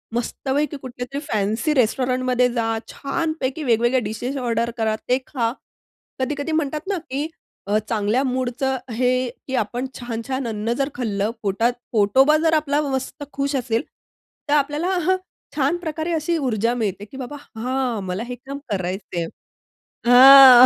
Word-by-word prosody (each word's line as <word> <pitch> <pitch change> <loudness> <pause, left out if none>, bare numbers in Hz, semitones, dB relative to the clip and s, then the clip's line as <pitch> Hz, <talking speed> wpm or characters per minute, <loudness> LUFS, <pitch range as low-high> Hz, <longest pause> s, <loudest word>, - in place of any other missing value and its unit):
मस्तपैकी 280 +5 -1
कुठल्यातरी 255 +1 -5
फॅन्सी 220 +6 0
रेस्टॉरंटमध्ये 255 0 +2
जा. 225 -2 0
छानपैकी 315 -1 -2
वेगवेगळ्या 240 0 +3
डिशेस 225 +6 -3
ऑर्डर 235 -2 0
करा, 220 -1 +1
ते 250 - +4
खा. 235 -5 0 0.7
कधी-कधी 285 +4 -2
म्हणतात 305 +1 -1
ना 395 -1 0
की 280 +4 -1 0.4
अ, 205 +1 +3
चांगल्या 220 +2 +1
मूडचं 260 0 -1
हे 245 +2 +1 0.4
की 265 - -2
आपण 245 +3 -1
छान-छान 245 +2 -3
अन्न 220 +1 -1
जर 275 0 0
खाल्लं, 215 -3 -1
पोटात 220 +5 +1 0.2
पोटोबा 260 +8 +5
जर 320 -1 +3
आपला 295 -2 +2
मस्त 275 +1 -3
खुश 280 +1 -1
असेल, 235 -2 0 0.7
तर - - +3
आपल्याला 295 +3 +1 0.2
हं, 375 0 +4 0.4
छान 290 +4 +2
प्रकारे 320 -1 -3
अशी 330 +1 0
ऊर्जा 235 -5 +1
मिळते 205 -4 -2
की 265 - -12
बाबा 270 +2 -6 0.2
हां. 250 -1 -1
मला 185 +4 -3
हे 250 - -4
काम 270 +3 -8
करायचंय 185 -2 -2 0.8
हां, 255 0 +10
255 Hz, 140 wpm, -22 LUFS, 230-280 Hz, 0.8 s, हां